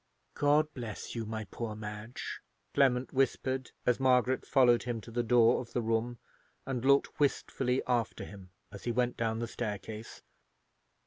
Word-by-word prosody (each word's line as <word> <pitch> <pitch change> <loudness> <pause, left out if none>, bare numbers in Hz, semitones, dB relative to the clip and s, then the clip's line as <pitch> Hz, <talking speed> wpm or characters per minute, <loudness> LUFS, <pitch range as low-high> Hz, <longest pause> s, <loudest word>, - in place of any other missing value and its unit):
God 150 +1 +3
bless 115 -5 -6
you, 115 -2 -4
my 110 0 -3
poor 115 -3 -4
Madge!" 105 +2 -6 0.3
Clement 130 -2 +3
whispered, 130 0 0 0.2
as 125 0 +3
Margaret 130 -1 +3
followed 125 -3 +5
him 120 -1 -3
to 115 - -11
the 120 +1 0
door 120 0 +4
of 120 - -11
the 120 - +1
room, 115 +2 0 0.5
and 130 -3 -3
looked 140 +1 +3
wistfully 135 -2 +1
after 120 -2 0
him 95 -2 -11 0.2
as 100 - -10
he 120 - +1
went 125 +1 +1
down 110 -1 -1
the 115 0 -2
staircase. 110 -1 -6
120 Hz, 155 wpm, -31 LUFS, 110-130 Hz, 0.5 s, followed